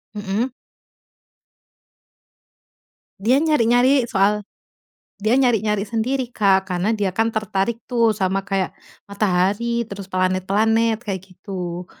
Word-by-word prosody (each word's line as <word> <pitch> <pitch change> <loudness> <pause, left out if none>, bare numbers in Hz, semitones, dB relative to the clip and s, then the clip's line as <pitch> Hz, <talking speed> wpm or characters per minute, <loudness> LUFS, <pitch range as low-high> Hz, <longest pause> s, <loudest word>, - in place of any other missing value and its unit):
Mhm. 205 +5 -2 2.7
Dia 250 +8 +3
nyari-nyari 255 -3 +3
soal 205 0 +1 0.8
dia 220 +5 +3
nyari-nyari 215 -5 +2
sendiri, 240 +3 -2
Kak, 195 -2 +3
karena 190 +4 -1
dia 200 -3 -1
kan 225 +3 +1
tertarik 215 0 -1
tuh 235 -2 +2
sama 195 -2 0
kayak, 195 -1 -2 0.3
matahari 205 +4 0
terus 200 -2 -9
planet-planet 200 +5 +1
kayak 205 -5 -5
gitu. 180 -2 -7
210 Hz, 100 wpm, -21 LUFS, 190-230 Hz, 2.7 s, Dia